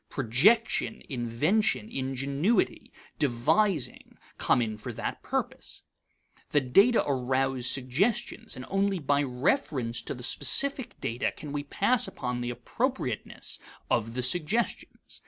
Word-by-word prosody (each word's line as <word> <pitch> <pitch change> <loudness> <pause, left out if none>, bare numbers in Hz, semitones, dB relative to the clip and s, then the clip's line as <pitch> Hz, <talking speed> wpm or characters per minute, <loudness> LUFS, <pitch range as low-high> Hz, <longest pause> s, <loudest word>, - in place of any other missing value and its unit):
Projection, 190 - +2
invention, 130 - 0
ingenuity, 140 - -1 0.3
devising 145 - 0 0.2
come - - +3
in 110 -3 -1
for 105 - -7
that - - -5
purpose. - - -4 0.7
The 145 - +3
data 195 - +4
arouse 130 -1 0
suggestions, 190 - 0
and 130 - -7
only 195 0 +1
by 145 -3 +1
reference 130 - 0
to - - -5
the 125 - -8
specific 275 - +2
data 120 +2 -1
can 150 -2 -9
we 145 0 -3
pass 215 - +1
upon 125 -1 -4
the 120 - -3
appropriateness 120 - -3 0.3
of 115 0 0
the 125 - -1
suggestions. 175 - -1
140 Hz, 120 wpm, -28 LUFS, 125-195 Hz, 0.7 s, data